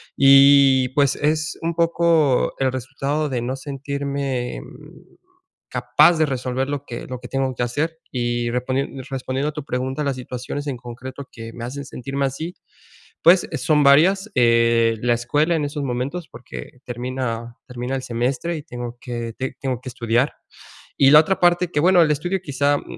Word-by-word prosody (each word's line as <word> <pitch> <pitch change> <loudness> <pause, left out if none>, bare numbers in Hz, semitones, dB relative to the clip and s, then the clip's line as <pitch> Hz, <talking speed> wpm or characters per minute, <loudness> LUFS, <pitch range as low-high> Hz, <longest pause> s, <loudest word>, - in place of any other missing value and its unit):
y 135 -1 +6
pues 140 0 +2
es 155 +1 -1
un 170 +1 0
poco 165 -4 +2
el 130 -1 +1
resultado 145 +3 -2
de 125 -2 -2
no 125 +3 -3
sentirme, 140 -2 -4
mm, - - -15 0.5
capaz 175 - +4
de 155 - +3
resolver 130 -1 -2
lo 145 0 -4
que 120 - -7
lo 125 -1 -6
que 125 - -9
tengo 135 -1 -1
que - - -1
hacer, 155 +7 -2
y 120 -1 -1
respon 125 +2 -1 0.3
respondiendo 135 +2 -2
a - - -4
tu 150 -2 -7
pregunta, 130 +3 -2
las 135 -2 -1
situaciones 125 +3 -6
en 130 -3 -3
concreto 130 +3 -9
que 115 -1 -9
me 120 0 -6
hacen 140 +3 -6
sentirme 135 +1 -3
así, 160 +7 -4 0.7
pues 175 +2 +6
eh, - - -2
son 150 -3 +2
varias, 190 +9 +5
eh, 115 -1 +3
la 120 -1 +2
escuela 145 +8 +1
en 155 -2 0
esos 145 0 -4
momentos, 135 +7 -3
porque 115 - -10
termina 120 -1 -4
termina 125 +1 -4
el 130 - -4
semestre 130 +8 -2
y 150 - -7
tengo 120 -3 -7
que 120 -2 -5
ti 130 0 -3
tengo 130 -3 -2
que 130 - -8
estudiar. 120 +2 0 0.7
Y 135 -1 +6
la 150 - +10
otra 190 +4 -1
parte 175 0 +3
que, 150 - 0
bueno, 180 +2 +5
el 150 - +2
estudio 175 +6 -1
quizá, 145 0 +1
mm, - - -8
135 Hz, 180 wpm, -21 LUFS, 125-150 Hz, 0.7 s, la